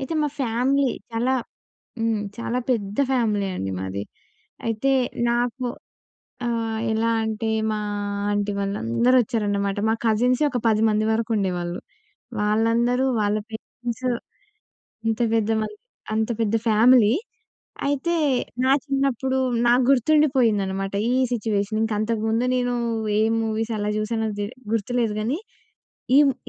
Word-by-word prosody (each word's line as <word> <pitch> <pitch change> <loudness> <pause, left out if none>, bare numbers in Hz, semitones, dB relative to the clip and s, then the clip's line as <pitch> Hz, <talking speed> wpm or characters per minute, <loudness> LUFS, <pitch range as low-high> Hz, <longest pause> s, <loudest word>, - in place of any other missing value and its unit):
అయితే, 270 +4 -3
మా 295 - +1
ఫ్యామిలీ 265 +3 +2 0.2
చాలా 240 +3 +1 0.7
హ్మ్. 225 -2 +1 0.2
చాలా 235 +1 -2
పెద్ద 205 -4 -1
ఫ్యామిలీ 215 -6 +1
అండి 95 0 -3
మాది. 95 +1 -4 0.6
అయితే 230 +5 +1 0.4
నాకు 245 +2 -1 0.8
ఆహ్, 225 -1 -1
ఎలా 225 +1 +1
అంటే 220 +1 -2 0.2
మా 215 - -1 0.5
ఆంటీ 205 0 0
వాళ్ళందరూ 200 - +1
వచ్చారన్నమాట. 205 -3 -1
మా 220 - +3
కజిన్సే 245 +5 +2
ఒక 250 - -1
10 215 -1 +2
మంది 215 0 +1
వరకు 225 +1 0
ఉండేవాళ్ళు. 180 -3 -2 0.6
వాళ్ళందరూ 230 +4 +2 0.2
వాళ్ళ 205 0 +1
పేరెంట్స్ 235 +2 -6 1.0
అంత 225 +1 0
పెద్ద 225 -1 +1
మంది 320 - -4 0.4
అంత 220 +1 0
పెద్ద 220 -1 +1
ఫ్యామిలీ. 225 0 +6 0.7
అయితే 285 +5 0 0.5
నా 265 - +4
చిన్నప్పుడు 270 -2 0 0.3
నాకు 245 +2 +4
గుర్తుండిపోయిందన్నమాట. 230 -9 +2 0.2
ఈ - - +2 0.2
సిట్యుయేషన్ 215 -2 -1
ఇంకా 220 -1 0
అంతకు 215 0 -1
ముందు 225 +3 +1
నేను 245 -1 0 0.4
ఏ - - +4 0.2
మూవీస్ 225 +1 -2
ఎలా 205 0 -1
చూసానో 220 +1 -1
దె 205 - -1 0.3
గుర్తులేదు 230 0 0
గానీ, 245 +9 -1 0.8
ఈ - - +8
ము - - -3
225 Hz, 125 wpm, -23 LUFS, 210-245 Hz, 1.0 s, ఈ